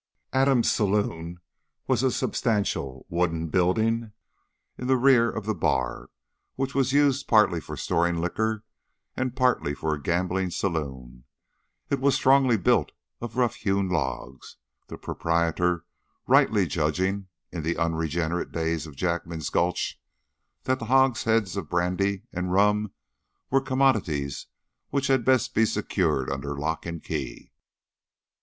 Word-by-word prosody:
Adams' 130 -2 +3
saloon 90 -5 -1 0.5
was 130 -3 +1
a 130 - +3
substantial 100 - -1
wooden 85 -1 -1
building 110 +6 +1 0.6
in 125 - -6
the 130 0 +4
rear 125 -2 +5
of 110 - -5
the 110 - 0
bar, - - -1 0.5
which 135 0 -2
was 135 -1 +1
used 140 -1 +2
partly 105 -7 +4
for - - -8
storing 85 0 +1
liquor 110 +5 -1 0.5
and 130 -1 -2
partly 125 - +1
for 80 +2 -1
a 75 - -5
gambling 90 +4 0
saloon. 65 -9 -4 0.7
It 140 - +1
was 140 +1 +3
strongly 130 -3 +4
built 95 - +2 0.3
of 120 +1 -6
rough 120 -3 +1
hewn 100 -2 0
logs, 65 -5 -4 0.3
the - - -8
proprietor 85 +1 0 0.4
rightly - - +4
judging, 95 +6 -1 0.2
in 85 - -4
the 80 +2 -2
unregenerate 80 +1 -1
days 80 -1 -2
of 75 - -12
Jackman's 85 -1 -2
Gulch, 85 0 0 0.6
that 130 0 0
hogsheads 115 -5 +2
of 90 -7 -4
brandy 90 +3 0
and 90 0 -2
rum 105 +2 +2 0.6
were 135 +1 +4
commodities 110 - 0 0.4
which 140 0 0
had 135 -2 +2
best 130 +1 +2
be 115 - +3
secured 65 - 0
under 70 +1 -4
lock 80 +4 -3
and 85 -1 -6
key. - - -5
95 Hz, 130 wpm, -26 LUFS, 80-120 Hz, 0.7 s, rear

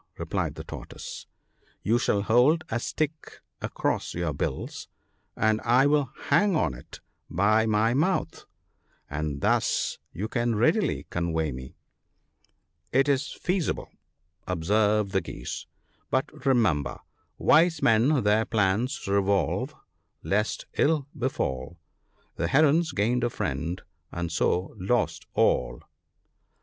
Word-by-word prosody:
" - - -36
replied - - -2
the - - -7
Tortoise; - - -8 0.3
" - - -38
you 115 +3 +2
shall 100 -5 +1
hold 125 +9 +4
a 115 - -1
stick 155 +5 -4 0.2
across - - -2
in 85 - -3
your 80 -4 -1
bills, 70 - -4 0.5
and 110 0 +2
I 120 +4 +4
will 145 -3 +2 0.2
hang 205 -3 +4
on 80 - +2
to 60 - -9
it - - -13 0.3
by 110 +5 +3
my 110 +2 +2
mouth 150 - 0 0.3
— - - -41
and 75 -1 -3
thus - - +1
you 100 +5 -4
can 120 0 0
readily 160 - +2
convey 80 -3 -1
me." 65 0 -9 0.6
" 85 - -43
It 135 +2 +3
is 140 +1 +1
feasible," 180 -2 -2 0.6
observed 105 +4 +1
the 95 - +1
Geese, - - -7 0.2
" - - -40
but 130 +1 -2
remember, 85 - +2 0.2
" - - -46
Wise 165 +2 +4
men 120 +4 +4
their 105 +2 +3
plans 110 +3 0
revolve, 100 -4 +1 0.5
lest 105 +2 0
ill 150 -2 +3
befall; 85 - -2 0.6
The 85 - 0
Herons 155 - +4
gained 120 +2 +1
a 120 - +2
friend, 90 -5 -3 0.3
and 85 -1 -3
so, 90 +2 0
lost 105 +5 0
all." - - +1
110 Hz, 135 wpm, -27 LUFS, 90-135 Hz, 0.6 s, hold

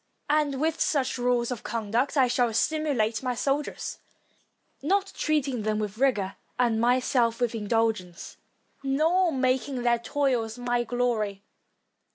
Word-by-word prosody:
And 295 -3 +1
with 320 +2 0
such 265 -4 +1
rules 245 0 +1
of 245 - -4
conduct 230 +6 -1
I 260 -2 +5
shall 245 -1 +1
stimulate 265 -6 +1
my 250 -2 -2
soldiers, 280 +4 -2 0.8
not 390 +6 0
treating 280 -6 0
them 215 0 0
with 210 0 -4
rigor 210 -8 +1 0.2
and 235 -3 +2
myself 245 -1 +2
with 245 -2 0
indulgence, 215 -5 -1 0.4
nor 325 +6 +2
making 260 -1 0
their 240 -1 +3
toils 245 -3 -1
my 245 0 0
glory. 230 -5 -1
245 Hz, 130 wpm, -27 LUFS, 225-275 Hz, 0.8 s, I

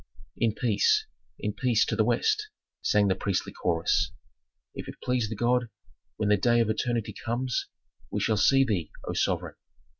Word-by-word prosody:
"In 110 -2 +1
peace, 115 -5 +2 0.3
in 105 - -3
peace 115 +1 +2
to - - -1
the 110 - +3
West," 425 - +1 0.3
sang 105 -1 +3
the 95 - +3
priestly 95 -1 -2
chorus. 85 -2 +1 0.6
"If - - -7
it - - -7
please 125 -4 0
the 110 - -4
god, 120 +2 +1 0.5
when 105 -1 0
the 105 - +5
day 120 +4 +3
of 115 -2 +2
eternity 115 0 -1
comes, 125 +2 -2 0.4
we - - -2
shall 110 -2 +1
see 135 +6 +5
thee, 95 - -1 0.2
O - - -2
sovereign! - - -1
115 Hz, 170 wpm, -27 LUFS, 105-125 Hz, 0.6 s, the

